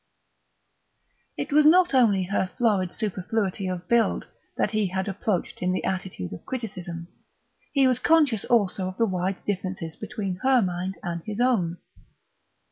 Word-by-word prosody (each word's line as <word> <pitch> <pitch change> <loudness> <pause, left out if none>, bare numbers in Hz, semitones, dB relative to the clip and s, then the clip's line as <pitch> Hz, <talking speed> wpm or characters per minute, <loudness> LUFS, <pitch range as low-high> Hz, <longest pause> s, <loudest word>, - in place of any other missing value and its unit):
It - - -4
was 305 +1 +6
not 350 +3 +6
only 220 -7 +4
her 190 0 -1
florid 205 -7 +2
superfluity 200 -1 -2
of 180 -1 -4
build 235 -1 +2 0.3
that - - +1
he 215 -2 +1
had 190 +1 -2
approached 195 -1 -2
in 180 0 +1
the 185 - -2
attitude 185 - -3
of 90 - -9
criticism; 180 -9 -6 0.6
he 275 -2 +4
was 255 -1 +3
conscious 285 -7 +3
also 200 -5 +2
of 185 - -6
the 230 - +3
wide 185 -1 -2
differences 185 -4 -3
between 200 -6 -4
her 265 -1 +4
mind 185 -1 -2
and 170 -2 -3
his 215 0 -5
own. 205 -9 +2
195 Hz, 150 wpm, -25 LUFS, 185-235 Hz, 0.6 s, was